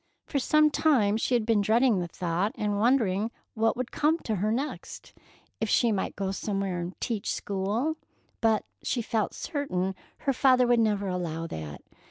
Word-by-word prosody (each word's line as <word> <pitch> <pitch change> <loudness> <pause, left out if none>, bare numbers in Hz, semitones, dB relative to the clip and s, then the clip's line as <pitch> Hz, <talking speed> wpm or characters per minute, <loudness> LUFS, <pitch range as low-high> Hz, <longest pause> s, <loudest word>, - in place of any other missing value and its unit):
For 280 - -1
some 305 +3 +4
time 245 -11 +3
she 235 +3 +1
had 230 -3 +1
been 225 -2 +3
dreading 225 +1 +3
the 175 - -2
thought, 175 +4 -1
and 205 -1 -1
wondering 220 -3 +2 0.2
what 225 +1 +1
would 255 -1 -3
come 310 +2 +2
to 220 -3 -2
her 210 +4 0
next? 270 +6 -4 0.5
If 220 - -1
she 235 +2 +3
might 200 -3 -2
go 195 -1 -2
somewhere 195 -2 -2
and 175 +2 -6
"teach 225 -2 -2
school,"—but 220 +1 -2 0.2
she 240 -3 -1
felt 215 -1 -1
certain 195 - -2 0.3
her 275 - +1
father 255 -1 +4
would 240 -1 +3
never 205 -3 +1
allow 170 -3 -3
that. 80 - -7
215 Hz, 170 wpm, -28 LUFS, 195-250 Hz, 0.5 s, some